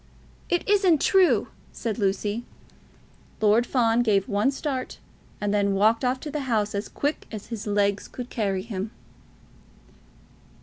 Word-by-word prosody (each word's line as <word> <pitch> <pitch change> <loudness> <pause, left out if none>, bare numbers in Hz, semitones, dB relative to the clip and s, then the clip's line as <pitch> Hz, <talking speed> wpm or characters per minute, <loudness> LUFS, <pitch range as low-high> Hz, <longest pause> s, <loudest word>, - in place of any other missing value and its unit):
"It 350 - 0
isn't 390 -6 +4
true!" 380 +2 +3 0.2
said 230 -1 -4
Lucy. 205 +3 0 1.0
Lord 220 +3 +3
Fawn 235 -2 +2
gave 205 -5 +2
one 205 +5 +2
start, 275 -2 -3 0.4
and 205 0 -1
then 200 -1 +2
walked 220 +4 +3
off 255 +1 +1
to 300 - -6
the 300 - -2
house 210 -3 +1
as 200 +1 -3
quick 290 +2 -2
as 215 -3 -8
his 220 -1 -5
legs 205 -1 +1
could 250 -1 -8
carry 195 -4 -1
him. 205 -2 -4
220 Hz, 140 wpm, -25 LUFS, 205-255 Hz, 1.0 s, isn't